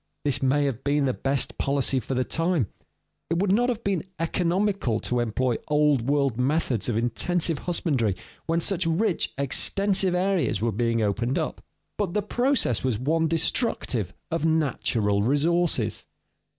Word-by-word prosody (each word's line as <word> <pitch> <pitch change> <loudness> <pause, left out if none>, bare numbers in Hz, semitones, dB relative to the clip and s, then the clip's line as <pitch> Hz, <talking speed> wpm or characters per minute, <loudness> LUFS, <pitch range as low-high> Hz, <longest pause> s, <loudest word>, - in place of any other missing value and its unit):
This 140 -3 +1
may 140 +2 +2
have 135 -3 -3
been 145 0 +1
the 130 - +1
best 135 0 -1
policy 135 -1 +1
for 130 +3 -4
the 130 - +1
time; 165 - 0 0.6
it 165 - 0
would 190 +2 +1
not 240 +5 +3
have 235 -2 -2
been 195 -5 0
economical 175 - 0
to 125 - 0
employ 120 +1 0
Old 150 -4 +2
World 140 -5 +1
methods 130 -4 0
of 115 - 0
intensive 160 +7 0
husbandry 135 - 0 0.3
when 165 +1 +1
such 185 -1 0
rich 175 +3 +1
extensive 190 +7 +1
areas 185 - +1
were 115 +2 0
being 115 +1 0
opened 115 +5 0
up. - - -3 0.4
But 195 -3 -1
the 210 - +1
process 245 - +1
was 130 -5 0
one 160 +7 +1
destructive 160 - 0 0.2
of 165 -2 -1
natural 120 -10 +1
resources. 145 - +1
145 Hz, 150 wpm, -25 LUFS, 125-175 Hz, 0.6 s, not